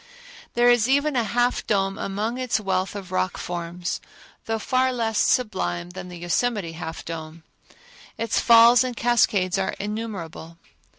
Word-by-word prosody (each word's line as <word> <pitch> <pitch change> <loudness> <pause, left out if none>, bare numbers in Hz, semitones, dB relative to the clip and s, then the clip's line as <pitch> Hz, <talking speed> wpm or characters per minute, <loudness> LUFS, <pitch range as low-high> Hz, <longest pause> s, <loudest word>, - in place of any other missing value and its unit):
There 240 0 +4
is 240 0 +3
even 285 +2 +2
a 240 - +2
Half 240 +3 0
Dome 195 -2 0
among 215 +5 -3
its 255 -3 0
wealth 190 -1 -1
of 190 -3 -7
rock 185 0 -1
forms, 175 +1 -4 0.4
though 225 0 -1
far 255 +4 +1
less 225 -3 -1
sublime 90 - 0
than 180 - -8
the 175 - -9
Yosemite 175 +2 -1
Half 165 0 -7
Dome. 160 0 -7 0.7
Its 225 0 0
falls 235 +1 +7
and 250 -2 -4
cascades 205 -6 +2
are 190 - -1
innumerable. 200 -6 -6
205 Hz, 145 wpm, -24 LUFS, 175-240 Hz, 0.7 s, falls